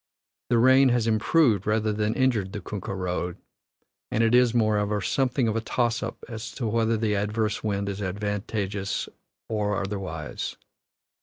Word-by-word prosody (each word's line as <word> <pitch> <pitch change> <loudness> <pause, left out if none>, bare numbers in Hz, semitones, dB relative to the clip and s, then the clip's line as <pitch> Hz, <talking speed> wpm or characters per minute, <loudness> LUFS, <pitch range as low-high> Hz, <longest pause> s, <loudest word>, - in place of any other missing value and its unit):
The 120 - +3
rain 130 +3 +6
has 120 -2 +2
improved 110 - +3
rather 110 0 +1
than 105 +1 0
injured 115 -8 +1
the 105 - -3
kunkah 100 0 -5
road, 90 -1 -3 0.7
and 115 - +1
it 115 +1 +3
is, 125 -1 +5
moreover, 105 -3 +1
something 130 +4 +1
of 110 - 0
a 115 - 0
toss 120 0 0
up 115 +1 -6
as 115 -1 -6
to 125 - -4
whether 115 +1 +1
the 110 -1 0
adverse 105 +1 -1
wind 100 -2 -1
is 100 0 -4
advantageous 100 0 -2 0.4
or 105 -2 0
otherwise. 95 -6 -4
110 Hz, 155 wpm, -26 LUFS, 100-115 Hz, 0.7 s, rain